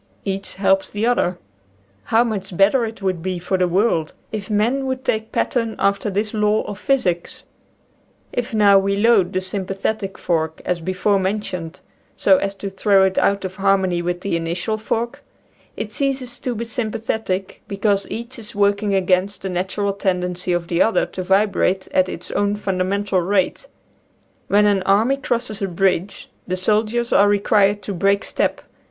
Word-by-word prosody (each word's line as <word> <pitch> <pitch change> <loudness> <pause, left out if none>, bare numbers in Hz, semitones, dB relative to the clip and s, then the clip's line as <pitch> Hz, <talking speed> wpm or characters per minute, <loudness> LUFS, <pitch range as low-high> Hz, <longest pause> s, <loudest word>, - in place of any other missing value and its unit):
Each 195 0 -4
helps 195 0 +2
the 205 +2 -2
other. 185 -7 +1 0.7
How 225 +1 +3
much 195 -6 -4
better 215 +5 +4
it 220 -2 -8
would 185 -3 -1
be 185 +1 -2
for 180 +2 -2
the 185 -1 +2
world 175 -3 +1 0.2
if 210 -2 -5
men 235 +6 +1
would 260 0 -3
take 220 -1 -1
pattern 230 -3 0
after 200 +1 +1
this 205 +2 -2
law 210 0 +2
of 205 -1 -7
physics! 180 -11 -1 0.9
If 245 -1 -2
now 205 -3 +5
we 200 +1 0
load 205 -3 +3
the 185 - -1
sympathetic 195 +1 -3
fork, 160 -2 -1
as 180 -1 0
before 185 +4 +1
mentioned, 185 -4 -3 0.3
so 285 - +4
as 195 -5 -2
to 195 0 -6
throw 195 0 +3
it 190 0 +2
out 200 -1 +1
of 185 +1 -6
harmony 190 -3 +2
with 175 +1 -2
the 200 -3 -1
initial 175 +6 -2
fork, 230 +2 -3 0.5
it 215 - -5
ceases 265 -1 -2
to 250 -2 -3
be 230 +2 -3
sympathetic, 220 -4 -3
because 200 0 0
each 235 +2 -6
is 215 -2 -9
working 200 0 +2
against 190 +1 +1
the 190 - -2
natural 190 +3 -1
tendency 180 -2 -1
of 175 -1 -1
the 170 0 +1
other 225 - +3
to 185 - -6
vibrate 190 0 +1
at 185 0 +3
its 175 - -7
own 205 0 +1
fundamental 195 0 0
rate. 190 - 0 0.8
When 205 +1 +4
an 200 -2 +3
army 210 +8 +3
crosses 230 -5 -2
a 195 - 0
bridge 185 +1 -1 0.2
the 185 0 -1
soldiers 215 +5 0
are 205 - +6
required 205 0 +2
to 200 - -4
break 200 +3 +2
step. - - -1
200 Hz, 170 wpm, -20 LUFS, 185-215 Hz, 0.9 s, are